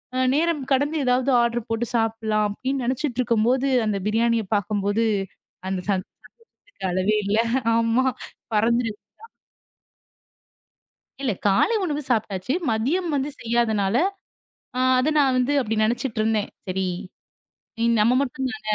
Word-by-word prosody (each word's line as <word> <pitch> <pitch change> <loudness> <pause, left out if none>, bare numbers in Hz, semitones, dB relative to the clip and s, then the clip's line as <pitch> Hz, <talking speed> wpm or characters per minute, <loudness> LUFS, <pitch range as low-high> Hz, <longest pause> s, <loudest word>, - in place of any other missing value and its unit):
அ - - -1 0.2
நேரம் 315 -1 +1
கடந்து 285 +4 +2
எதாவது 250 +1 +2
ஆடர் 235 -1 -1
போட்டு 225 +1 -1
சாப்பிடலாம் 220 -2 +1
அப்படின்னு 260 +5 -3
நெனச்சிட்டு 255 0 -2
இருக்கும்போது 245 +3 +2 0.2
அந்தப் 200 -3 -2
பிரியாணியப் 225 -1 +1
பாக்கும்போது 205 +2 0 0.6
அந்தச் 190 +1 -4 0.6
சந்தோஷத்துக்கு 405 - -11
அளவே 185 +4 +1
இல்ல. 200 +2 +1 0.4
ஆமா 230 +3 +2 0.5
பறந்துச்சு 230 +1 +2 2.3
இல்ல 265 -5 0
காலை 200 - +3
உணவு 300 -4 -2
சாப்பிட்டாச்சு 215 0 0 0.2
மதியம் 295 +11 0
வந்து 280 +1 -1
செய்யாதனால 225 -3 +1 0.8
அ - - 0 0.2
அத 265 +5 +2
நான் 270 -3 +3
வந்து 255 +3 +1
அப்படி 225 -4 -1
நினைச்சிட்டு 230 +1 -1
இருந்தேன். 215 -1 0 0.2
சரி, 190 +1 -1 1.2
நம்ம 225 +4 +4
மட்டும் 265 -1 -2
தான 290 - -8
230 Hz, 120 wpm, -23 LUFS, 215-260 Hz, 2.3 s, நம்ம